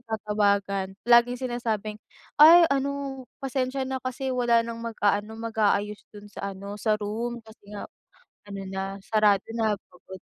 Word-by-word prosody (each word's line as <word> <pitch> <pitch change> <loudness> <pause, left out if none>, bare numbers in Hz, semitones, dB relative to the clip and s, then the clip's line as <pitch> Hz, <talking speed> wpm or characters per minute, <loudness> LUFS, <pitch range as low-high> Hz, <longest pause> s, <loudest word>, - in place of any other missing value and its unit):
natatawagan, 200 -3 -1
laging 245 +1 +6
sinasabing, 220 -3 -3 0.4
"Ay 335 +3 +10
ano, 275 -1 -2 0.2
pasensya 265 0 -2
na 265 0 -3
kasi 260 +1 -3
wala 240 -2 +3
nang 230 0 -6
mag-aano, 210 -1 0
mag-aayos 210 -2 0
dun 205 0 -12
sa 200 0 -5
ano, 200 +2 -8
sa 215 - +2
room, 230 +3 -3
kasi 220 -1 -17
nga 205 - -6 0.7
ano 195 -1 -6
na, 195 +1 -4
sarado 210 -3 +3
na" 220 -2 +1 0.2
Pagod 185 +1 -12
220 Hz, 140 wpm, -26 LUFS, 205-245 Hz, 0.7 s, Ay